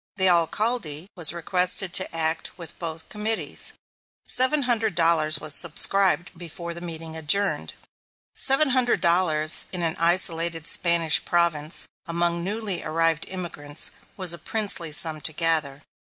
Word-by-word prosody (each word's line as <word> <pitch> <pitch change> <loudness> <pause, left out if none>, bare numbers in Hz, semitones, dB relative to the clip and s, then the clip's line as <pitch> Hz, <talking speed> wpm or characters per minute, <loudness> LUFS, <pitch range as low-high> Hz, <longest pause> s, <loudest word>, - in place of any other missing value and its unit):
The 190 -2 +2
Alcalde 170 -1 0
was 170 -4 +3
requested 180 +2 0
to 190 - +4
act 160 0 -2
with 170 -2 -11
both 160 -2 -7
committees. 210 -7 -2 0.5
Seven 265 +3 +2
hundred 230 -3 0
dollars 165 -2 +2
was 155 -1 +2
subscribed 180 +2 +2
before 170 0 -9
the 170 - -9
meeting 165 -2 -8
adjourned. 160 +6 0 0.6
Seven 270 +2 +2
hundred 250 -1 +1
dollars, 165 -3 +2
in 180 -2 -4
an 165 -1 -1
isolated 165 -1 +2
Spanish 170 -2 +2
province, 170 -3 -1 0.2
among 170 0 -1
newly 205 -1 -2
arrived 165 0 0
immigrants, 160 -5 -5 0.3
was 185 -3 +5
a 170 - -7
princely 205 -7 -2
sum 155 0 +1
to 155 - -1
gather. 155 -3 0
170 Hz, 135 wpm, -23 LUFS, 160-190 Hz, 0.6 s, was